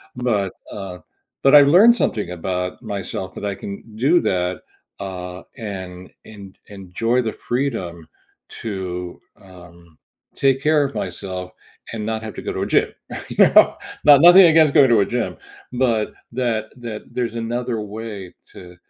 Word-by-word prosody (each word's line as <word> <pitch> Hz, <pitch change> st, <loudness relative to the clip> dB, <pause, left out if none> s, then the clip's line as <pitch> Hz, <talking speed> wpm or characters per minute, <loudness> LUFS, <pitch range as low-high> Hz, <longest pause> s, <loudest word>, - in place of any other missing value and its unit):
but, 110 Hz, -6 st, -1 dB, 0.2 s
uh 95 Hz, -3 st, -7 dB, 0.4 s
but 135 Hz, +2 st, +6 dB
I 145 Hz, -, +10 dB
learned 185 Hz, +12 st, +6 dB
something 105 Hz, -, -2 dB
about 90 Hz, +2 st, -4 dB
myself 100 Hz, -3 st, -5 dB
that -, -, -6 dB
I 100 Hz, -1 st, -2 dB
can 105 Hz, +2 st, -9 dB
do 140 Hz, +10 st, +3 dB
that, 90 Hz, 0 st, -1 dB, 0.4 s
uh, 90 Hz, -2 st, -7 dB
and 95 Hz, -5 st, -8 dB
en 100 Hz, -3 st, -12 dB
enjoy 105 Hz, +5 st, -2 dB
the 115 Hz, -3 st, -2 dB
freedom 105 Hz, -, -4 dB, 0.5 s
to, 90 Hz, -4 st, -5 dB, 0.2 s
um, 85 Hz, -3 st, -17 dB, 0.4 s
take 135 Hz, -1 st, +2 dB
care 150 Hz, -1 st, +3 dB
of 140 Hz, 0 st, -4 dB
myself 90 Hz, 0 st, -5 dB, 0.4 s
and 105 Hz, -2 st, -4 dB
not 110 Hz, 0 st, -3 dB
have 110 Hz, -2 st, -7 dB
to -, -, -7 dB
go -, -, -4 dB
to -, -, -4 dB
a -, -, -3 dB
gym, -, -, +2 dB, 0.4 s
you -, -, -8 dB, 0.2 s
know? -, -, +6 dB, 0.3 s
Not 145 Hz, -2 st, +7 dB
nothing 175 Hz, +3 st, +9 dB
against 160 Hz, -3 st, +4 dB
going 140 Hz, -4 st, +6 dB
to 115 Hz, -3 st, +4 dB
a 100 Hz, -, +2 dB
gym, 120 Hz, -1 st, -3 dB, 0.3 s
but 120 Hz, -4 st, 0 dB, 0.2 s
that 115 Hz, -3 st, -2 dB
that 115 Hz, -3 st, -7 dB
there's 120 Hz, -2 st, -3 dB
another 120 Hz, 0 st, -3 dB
way 105 Hz, -3 st, -8 dB, 0.2 s
to 90 Hz, -1 st, -13 dB
110 Hz, 155 wpm, -20 LUFS, 95-125 Hz, 0.5 s, I